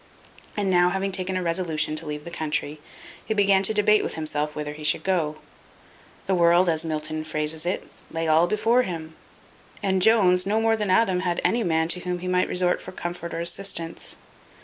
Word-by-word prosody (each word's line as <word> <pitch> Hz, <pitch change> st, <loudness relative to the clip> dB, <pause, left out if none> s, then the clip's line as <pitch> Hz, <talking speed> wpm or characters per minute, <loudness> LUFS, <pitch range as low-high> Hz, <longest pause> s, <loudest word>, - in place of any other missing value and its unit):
And 200 Hz, -2 st, 0 dB
now 175 Hz, 0 st, +4 dB
having 195 Hz, +2 st, -2 dB
taken 185 Hz, 0 st, -1 dB
a 185 Hz, -, -2 dB
resolution 165 Hz, -3 st, -1 dB
to 160 Hz, -, -3 dB
leave 150 Hz, 0 st, -5 dB
the 170 Hz, -, -8 dB
country, 150 Hz, -2 st, -3 dB, 0.4 s
he 220 Hz, -, -2 dB
began 200 Hz, -2 st, +4 dB
to 195 Hz, -, +4 dB
debate 210 Hz, 0 st, +3 dB
with -, -, -4 dB
himself 150 Hz, -1 st, -2 dB
whither 150 Hz, -1 st, -4 dB
he 150 Hz, +1 st, -10 dB
should 150 Hz, -, 0 dB
go. 170 Hz, -5 st, 0 dB, 0.9 s
The 190 Hz, -, 0 dB
world, 175 Hz, 0 st, +4 dB
as 160 Hz, -1 st, +2 dB
Milton 155 Hz, -1 st, -3 dB
phrases 155 Hz, +1 st, -3 dB
it, 180 Hz, -, -2 dB, 0.2 s
lay 165 Hz, 0 st, -3 dB
all 160 Hz, +2 st, +4 dB
before 225 Hz, +5 st, +2 dB
him; 165 Hz, -7 st, -5 dB, 0.7 s
and 190 Hz, -1 st, +1 dB
Jones, 185 Hz, -4 st, +4 dB
no 210 Hz, +3 st, 0 dB
more 225 Hz, 0 st, +2 dB
than 210 Hz, -3 st, -2 dB
Adam, 185 Hz, -1 st, +3 dB
had 180 Hz, -1 st, -1 dB
any 235 Hz, 0 st, +2 dB
man 160 Hz, -2 st, +1 dB
to 180 Hz, -, 0 dB
whom 180 Hz, 0 st, -3 dB
he 180 Hz, +1 st, -6 dB
might 180 Hz, 0 st, +1 dB
resort 180 Hz, 0 st, +2 dB
for -, -, -9 dB
comfort 175 Hz, -1 st, -6 dB
or 165 Hz, -, -3 dB
assistance. 170 Hz, -1 st, -2 dB
175 Hz, 195 wpm, -24 LUFS, 160-190 Hz, 0.9 s, now